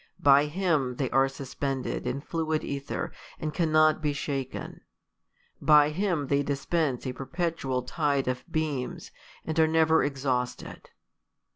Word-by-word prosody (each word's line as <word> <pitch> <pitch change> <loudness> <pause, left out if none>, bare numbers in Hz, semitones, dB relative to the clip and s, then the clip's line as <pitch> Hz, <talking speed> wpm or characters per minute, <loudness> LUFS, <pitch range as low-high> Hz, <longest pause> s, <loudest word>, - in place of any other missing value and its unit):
By 140 +1 +6
Him 150 -6 0
they 130 0 -2
are 135 +2 +4
suspend 135 -1 -4
ed - - -3
in 130 +3 -2
fluid 160 0 -2
ether, 140 0 -4 0.3
and 155 -1 -3
cannot 155 -2 +3
be 150 -2 0
sha]<en: 135 -2 -4 0.8
by 150 0 +6
Him 175 -3 0
they 140 +1 +2
dispense 140 -1 -1
a 130 - -2
perpetual 135 -3 -2
tide 140 0 0
of 125 0 -2
beams, 150 -6 -3 0.3
and 160 0 -1
are 160 - +6
never 160 0 +4
ex 140 -2 -2
hausted. 125 -2 -2
145 Hz, 140 wpm, -28 LUFS, 135-160 Hz, 0.8 s, By